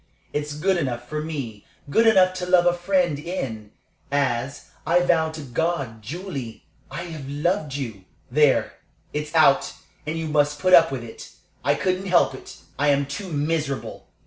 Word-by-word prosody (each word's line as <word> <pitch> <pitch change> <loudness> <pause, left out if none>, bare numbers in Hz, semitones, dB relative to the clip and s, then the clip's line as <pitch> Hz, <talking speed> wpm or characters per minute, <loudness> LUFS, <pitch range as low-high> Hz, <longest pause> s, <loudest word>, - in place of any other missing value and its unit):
It's 150 0 -3
good 185 +5 +1
enough 120 -6 -3
for 150 +2 -3
me 135 -10 -5 0.3
good 225 +8 +4
enough 185 -4 +5
to 180 - -4
love 180 -1 +5
a 175 - +4
friend 175 -4 +1
in, 130 - -5 0.4
as 140 -1 -1
I 175 +2 +3
vow 165 -2 +2
to 160 0 -7
God, 140 -4 -2
Julie! 140 - -6 0.2
I 170 - -5
have 155 -6 -7
loved 150 0 -1
you. 110 -9 -5 0.3
"There, 145 0 +3 0.3
it's 150 +2 -4
out, 150 -4 +4 0.3
and 160 +2 -2
you 160 -1 -3
must 150 -1 +2
put 185 +6 +2
up 165 -3 +8
with 130 -3 -4
it. 115 - -10 0.3
I - - +3
couldn't 185 +1 -1
help 175 -6 +4
it. 130 - -11 0.2
I 145 - +2
am 140 0 +3
too 180 +7 -6
miserable. 150 -1 -2
150 Hz, 170 wpm, -24 LUFS, 135-175 Hz, 0.4 s, up